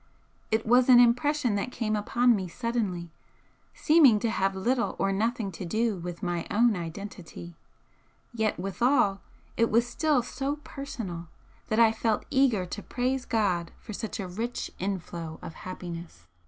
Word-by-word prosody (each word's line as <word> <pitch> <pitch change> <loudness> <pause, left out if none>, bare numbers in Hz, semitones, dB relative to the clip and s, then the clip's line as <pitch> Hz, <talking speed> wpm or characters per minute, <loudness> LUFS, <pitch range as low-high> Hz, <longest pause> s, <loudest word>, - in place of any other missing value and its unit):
It 220 0 +1
was 245 +3 +4
an 245 -1 +9
impression 245 +1 +3
that 250 +5 -3
came 215 -3 -1
upon 240 +3 +3
me 190 -3 -3
suddenly, 195 -5 -3 0.6
seeming 300 -8 +6
to 230 - 0
have 195 -3 0
little 240 +6 0
or 195 - +1
nothing 220 0 -1
to 180 - -7
do 220 +5 0
with 175 +1 -7
my 175 -2 -2
own 230 +1 +3
identity, 175 -1 -7 0.8
yet 220 -4 0
withal 195 +1 +2 0.4
it 230 0 +3
was 230 +2 +3
still 285 +1 +1
so 275 +3 -3
personal 215 - -6 0.4
that 215 - 0
I 225 -1 +7
felt 225 -1 -1
eager 260 -9 +3
to 205 +3 -6
praise 255 +4 -2
for 200 -1 -1
such 220 +2 -5
a 195 - -3
rich 225 +7 -4
inflow 170 -4 -4
of 165 - -7
happiness. 170 - -8
215 Hz, 150 wpm, -28 LUFS, 185-240 Hz, 0.8 s, an